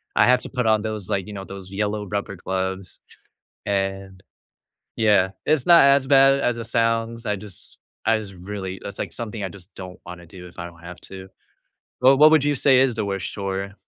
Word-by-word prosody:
I - - +5
have 125 0 +4
to - - -7
put 125 -2 -2
on 110 -1 +3
those 110 -4 -5
like, 95 -2 -1
you 105 - -8
know, 100 -1 -6
those 95 -1 -10
yellow 105 +1 -2
rubber 100 0 -4
gloves 95 +1 -4 0.7
and 95 -1 -3 0.7
yeah, 100 -4 +3
it's 150 -4 +1
not 170 -3 +7
as 140 -1 +4
bad 135 0 +5
as 120 -3 0
it 115 - -5
sounds, 115 0 -1
I 105 - 0
just 100 -2 -12 0.3
I 110 0 +3
just 105 -2 -7
really 95 0 -6
it's 100 - -8
like - - -4
something 110 -3 -5
I 95 - -3
just 95 +1 -13
don't 90 -1 -9
wanna 85 -1 -10
do 90 +1 -12
if 85 - -17
I 85 - -5
don't 85 -1 -12
have 90 0 -10
to. 95 0 -10 0.7
Well, 130 +2 +6
what 155 +1 +8
would 155 -3 +5
you 145 0 +2
say 130 -1 +4
is 130 -3 +2
the 110 -2 -2
worst 95 -4 -3
chore? 100 0 -4
100 Hz, 210 wpm, -23 LUFS, 95-115 Hz, 0.7 s, what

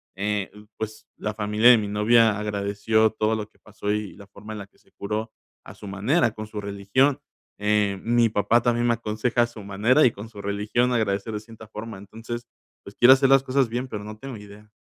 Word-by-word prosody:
eh, 100 0 -2 0.3
pues, 110 0 -6
la 105 0 -3
familia 105 +2 +3
de 125 - +8
mi 105 - -2
novia 110 +1 +3
agradeció 105 +1 +1
todo 110 0 0
lo 105 -1 -4
que - - -31
pasó 105 -1 -7
y 105 -2 -3
la 100 - -13
forma 105 +2 -11
en 105 - -6
la 100 - -8
que - - -33
se - - -30
curó, 105 +2 -4 0.3
a - - -11
su 105 - -11
manera 110 - +1
con 110 0 -7
su 105 -1 -6
religión, 100 +8 +1 0.4
eh, 105 -1 +1
mi 120 0 +3
papá 110 +3 +2
también 120 0 +1
me 120 - +4
aconseja 115 +2 0
a - - 0
su 115 -2 -11
manera 110 +9 +3
y 120 - +5
con 105 +2 -9
su 105 -3 -10
religión 105 +5 0
agradecer 110 -2 -1
de 105 - -3
cierta 110 0 -13
forma. 110 -1 -7
Entonces, 115 +4 -8 0.4
pues, 100 - -12
quiero 125 +2 +8
hacer 135 0 +3
las 135 -1 +5
cosas 130 -2 +1
bien, 125 +3 -3
pero 105 -4 -6
no 105 +1 -8
tengo 135 +2 -8
idea. 105 +1 -14
110 Hz, 220 wpm, -24 LUFS, 105-120 Hz, 0.4 s, de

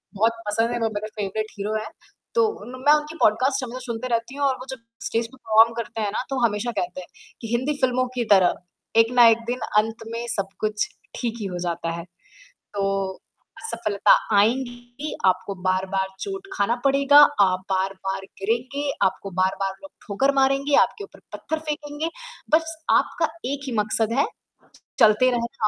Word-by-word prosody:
बहुत 225 +3 +3
पसंद 225 +3 +1
हैं 240 - -2
वो 225 -1 +1
मेरे 210 +1 -3
फेवरेट 210 +2 -2
हीरो 210 +2 -2
हैं। 215 0 -5 0.5
तो 475 - +5 0.3
म - - -12
मैं 295 - +8
उनकी 300 +1 0
पॉडकास्ट 260 +5 +3
हमेशा 250 0 -6
सुनते 235 +1 -4
रहती 235 +2 -1
हूँ 285 0 0
और 265 - +1
वो 255 - -8
जब 265 - -6 0.3
स्टेज 230 0 -1
पे 260 +3 -17
परफॉर्म 225 -1 +4
करते 225 -1 -4
हैं 205 -1 -1
ना 215 - -2
तो 270 - -2
हमेशा 220 +2 -1
कहते 180 +1 -4
हैं 180 - -12 0.3
कि 230 - -5
हिंदी 260 +5 0
फिल्मों 255 0 +2
की 240 -2 0
तरह 185 -3 +4 0.4
एक 225 +1 +4
ना 245 -1 +7
एक 225 -1 +6
दिन 245 +1 -2 0.2
अंत 225 +1 +1
में 235 +1 -3
सब 195 -1 -1
कुछ 210 -1 0 0.3
ठीक 235 -2 -2
ही - - -3
हो - - -3
जाता 170 -1 -2
है। 170 0 -5 0.7
तो 200 -1 0 0.8
असफलता 220 - +1 0.3
आएँगी 245 +5 0
आपको 185 +2 +1
बार-बार 190 +1 0
चोट 390 -1 -5
खाना 205 +4 +1
पड़ेगा, 275 +1 +5 0.2
आप 185 -2 +3
बार-बार 190 0 -1 0.2
गिरेंगे, 250 +8 -1 0.2
आपको 195 +1 -2
बार-बार 190 +1 +1
लोग 290 - -11 0.2
ठोकर 245 +7 +2
मारेंगे, 275 +1 +3
आपके 410 - -1
ऊपर - - -13
पत्थर 315 - -3
फेंकेंगे। 295 +1 -3 0.5
बस 325 0 0 0.2
आपका 325 - +2 0.2
एक 280 0 -3
ही - - -3
मकसद 220 +1 0
है - - +4 0.7
चलते 220 +4 +6
रहना, 235 -1 -1
230 Hz, 180 wpm, -24 LUFS, 205-265 Hz, 0.8 s, मैं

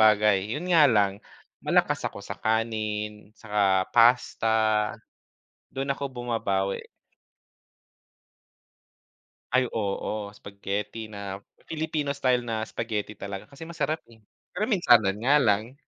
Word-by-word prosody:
bagay, 105 -2 +4
'yun 180 +3 -2
nga 155 -4 +7
lang 100 -3 +2 0.4
malakas - - +2
ako - - -11
sa - - -6
kanin 110 -2 -2
saka 100 -3 +1
pasta, 120 -1 +4 1.3
do'n 135 +1 -3
ako 140 +1 -1
bumabawi. 105 -6 -1 2.7
Ay, 130 -1 +3
oo, 105 0 -3
spaghetti 105 +2 -5
na 100 -1 -6 0.3
Filipino 155 -2 -2
style 125 -3 +1
na 110 -2 -2
spaghetti 110 -2 -4
talaga 100 -1 -6
kasi 145 +3 -10
masarap, 160 -1 -2
eh. 115 -1 -19 0.3
Pero 205 - 0
minsanan 120 - +4
nga 135 +6 +3
lang. 110 +3 +1
110 Hz, 110 wpm, -26 LUFS, 100-125 Hz, 2.7 s, nga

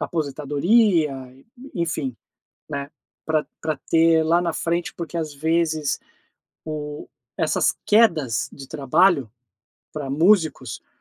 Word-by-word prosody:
aposentadoria, 155 - +2 0.2
e 135 - -21 0.3
enfim, 160 -7 -2 0.5
né. 140 0 -5 0.3
Pra 155 -1 0
pra 155 -2 -2
ter 165 0 +5
lá 170 +2 +3
na 170 -2 -1
frente, 170 +2 -2
porque 170 0 -6
às 155 -3 -3
vezes 160 0 0 0.6
o 150 -1 -6 0.3
essas - - +1
quedas 165 - +3
de 135 - -10
trabalho, 145 - +2 0.6
para 145 -3 -5
músicos, 160 - +2
eh, - - -44
155 Hz, 115 wpm, -23 LUFS, 140-170 Hz, 0.6 s, ter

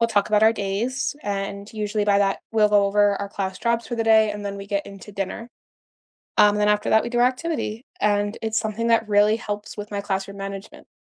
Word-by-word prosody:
we'll 230 - +4
talk 205 -3 +1
about 215 0 +3
our 220 +1 +6
days 230 +7 -2
and, 200 0 -4
usually 210 -1 -2
by 200 -1 +3
that 195 -1 +1
we'll 215 -1 +4
go 205 -1 +4
over 205 0 +3
our 200 - -4
class 190 -2 -3
jobs 235 0 0
for 240 - -3
the 225 - -1
day, 220 -1 +5
and 205 0 -6
then 200 0 -4
we 195 - -8
get 200 0 -2
into 195 +1 -11
dinner, 200 +4 -5 0.9
um, 210 0 +6
then 210 0 +2
after 210 0 +1
that 220 - +5
we - - -3
do 240 - -1
our 245 - +6
activity. 255 -4 -3 0.2
And, 205 0 +1
it's 220 0 0
something 220 +1 -2
that 225 -1 +2
really 210 +1 +4
helps 210 -3 -6
with 205 0 -7
my 200 - -2
classroom 195 0 -3
management. 195 0 -8
210 Hz, 230 wpm, -23 LUFS, 200-225 Hz, 0.9 s, our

